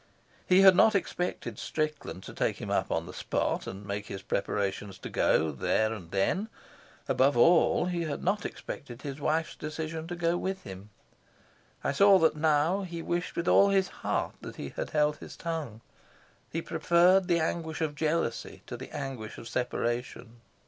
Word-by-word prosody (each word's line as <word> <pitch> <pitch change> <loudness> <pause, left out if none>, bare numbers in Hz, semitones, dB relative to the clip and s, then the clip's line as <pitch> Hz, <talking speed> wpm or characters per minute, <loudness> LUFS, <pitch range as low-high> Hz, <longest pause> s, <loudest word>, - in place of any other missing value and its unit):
He 185 +1 +6
had 190 -1 +8
not 220 +3 +5
expected 180 -2 -2
Strickland 155 - -3
to - - -9
take - - -1
him - - -5
up - - 0
on - - 0
the - - -9
spot - - -1
and 100 +2 -7
make 100 0 -4
his 95 0 -7
preparations 100 -1 -2
to - - -8
go 80 0 +2
there 110 - +1
and 90 -7 -9
then; 100 - 0 0.6
above 135 0 +3
all, 170 +6 +5
he 175 -2 -1
had 150 -2 -4
not 200 +3 +1
expected 125 -2 -7
his 140 -1 -5
wife's 160 +2 0
decision 160 +1 -5
to 175 - -4
go 170 0 +1
with 190 +1 -3
him. 95 +2 -9 0.9
I - - +1
saw 200 +6 +6
that 165 -3 +3
now 155 +4 +2
he 170 -3 -6
wished 175 +1 -2
with 170 +1 -2
all 200 - +6
his 195 -1 +2
heart - - -1
that - - -8
he - - -6
had - - -5
held 150 -1 +2
his - - -11
tongue. 155 -10 -4 0.7
He 165 +1 -3
preferred 175 +3 +4
the 170 -2 +3
anguish 160 0 -2
of 160 -2 -1
jealousy 150 -5 -2
to 120 - -6
the 130 - -9
anguish 130 -6 -5
of 115 - -9
separation. 120 -1 -3
155 Hz, 175 wpm, -29 LUFS, 120-175 Hz, 0.9 s, had